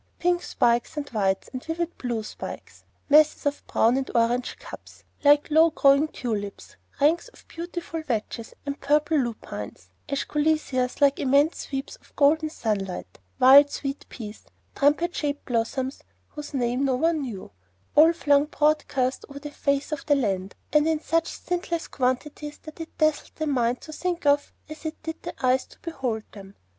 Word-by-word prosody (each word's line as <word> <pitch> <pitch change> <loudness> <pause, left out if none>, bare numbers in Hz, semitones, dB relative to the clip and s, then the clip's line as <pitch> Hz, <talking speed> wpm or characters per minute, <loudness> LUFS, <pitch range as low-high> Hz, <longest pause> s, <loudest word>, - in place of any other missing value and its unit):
Pink 350 0 +1
spikes 235 0 +1
and 290 -1 -3
white 195 -4 0
and 255 - -5
vivid 335 +1 -3
blue 235 -3 -2
spikes; - - -9 0.2
masses 305 +1 +5
of 285 0 -2
brown 235 +3 +3
and 270 - -2
orange 240 +2 +1
cups, - - -12 0.2
like 290 +1 +5
low 320 +2 +6
growing 280 -1 +4
tulips; 210 -8 -5 0.2
ranks 315 - +3
of - - -19
beautiful 340 -1 -5
vetches 230 -4 -4
and 280 0 -4
purple 300 +2 +2
lupines; 105 - -4 0.2
escholtzias, 290 -3 0
like 280 -1 +4
immense 280 +4 +2
sweeps 275 - -5
of - - -26
golden 310 +2 +3
sunlight; 195 - -3 0.2
wild 280 +3 +8
sweet 275 -1 -5
peas; 215 -3 -9 0.3
trumpet 300 +5 +2
shaped 290 -1 -2
blossoms 255 +3 -2 0.3
whose 295 -1 -8
name 245 +1 0
no 265 -2 +2
one 320 +3 +1
knew, 215 - -6 0.4
all 315 +3 +8
flung 290 -3 +3
broadcast 295 -4 0
over 280 - -9
the 295 +1 -7
face 280 +1 -1
of 305 - -3
the 290 - +5
land, 195 -7 -1 0.2
and 300 +1 +4
in 320 -1 +1
such 330 +1 0
stintless 345 -2 -3
quantities 290 +3 -2
that 310 +1 -11
it 325 - -9
dazzled 310 -1 +1
the 315 - -2
mind 250 -4 +1
to 310 - -10
think 350 0 -3
of 285 0 +3 0.2
as 310 0 -10
it 315 0 -4
did 320 0 -5
the 265 - -5
eyes 255 +1 +2
to - - -18
behold 265 -10 -3
them. 195 -1 -12
285 Hz, 165 wpm, -25 LUFS, 250-310 Hz, 0.4 s, wild